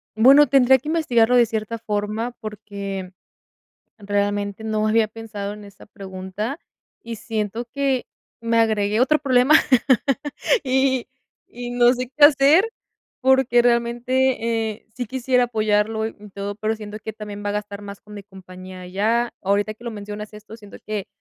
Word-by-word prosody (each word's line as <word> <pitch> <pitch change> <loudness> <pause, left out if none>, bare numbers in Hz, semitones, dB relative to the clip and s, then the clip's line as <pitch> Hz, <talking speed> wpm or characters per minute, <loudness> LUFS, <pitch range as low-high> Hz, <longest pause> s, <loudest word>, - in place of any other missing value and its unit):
bueno, 270 +7 +7
tendría 265 -2 +5
que 270 +4 -8
investigarlo 250 -8 +2
de 240 -1 +5
cierta 220 +1 -4
forma 215 +2 -3
porque, 200 -3 -6 0.9
realmente, 205 0 -2
no 215 -1 0
había 220 0 +3
pensado 210 -2 -7
en 210 0 -11
esa 200 -1 -15
pregunta, 195 +6 -6 0.4
y 230 0 -6
siento 220 +1 -4
que 270 +1 -1 0.4
me 230 0 0
agregué 215 -1 +1
otro 305 +4 +3
problema, 260 0 +3 1.1
y 265 -1 +1 0.4
y 245 0 -7
no 245 0 +4
sé 250 0 -4
qué 300 - +4
hacer, 300 +9 +5 0.5
porque, 265 -2 +4
realmente, 235 -1 +1
eh, 215 - -19
sí 245 0 -3
quisiera 255 0 +1
apoyarlo 220 -1 0
y - - -8 0.2
todo, 200 0 -5
pero 215 +1 -2
siento 210 0 -8
que 220 - -6
también 205 -1 -8
va 205 - 0
a - - -1
gastar 205 -1 -5
más 200 -1 -9
con 210 - -14
mi 205 - -8
compañía 185 -1 -12
allá, 215 +6 0
ahorita 205 +2 0
que 230 - -18
lo 235 - -4
mencionas 210 0 -8
esto, 215 +1 -11
siento 205 -3 -13
que 210 -3 -3
220 Hz, 155 wpm, -22 LUFS, 205-245 Hz, 1.1 s, bueno